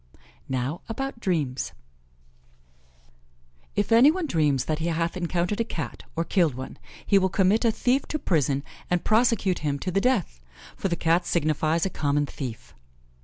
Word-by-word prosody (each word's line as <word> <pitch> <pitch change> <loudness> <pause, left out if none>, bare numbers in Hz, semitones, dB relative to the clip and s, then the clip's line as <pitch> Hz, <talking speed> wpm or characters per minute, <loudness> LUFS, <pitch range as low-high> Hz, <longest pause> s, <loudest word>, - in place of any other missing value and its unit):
Now 130 +5 -2
about 270 +1 -4
dreams: 150 - -1 2.0
If 205 +2 0
any 235 +5 +8
one 355 +2 0
dreams 150 - +1
that 155 0 -1
he 165 - -1
hath 165 +1 -1
encountered 180 +3 -1
a - - +3
Cat, 165 -8 -5
or 165 - 0
killed 165 - +2
one, 130 +1 -8 0.3
he 200 - +5
will 190 0 +1
commit 195 +5 +2
a 230 - +5
thief 255 +5 +1
to 305 - -2
prison 145 - +1 0.3
and 180 -1 +1
prosecute 220 -4 +2
him 145 -2 -1
to 185 +6 -3
the 195 +2 +1
death, 200 - 0 0.3
for - - -2
the 175 - 0
Cat 170 +1 +1
signifies 155 +1 +1
a 190 - -2
common 145 -1 0
thief. 125 -5 -7
170 Hz, 165 wpm, -26 LUFS, 150-210 Hz, 2.0 s, any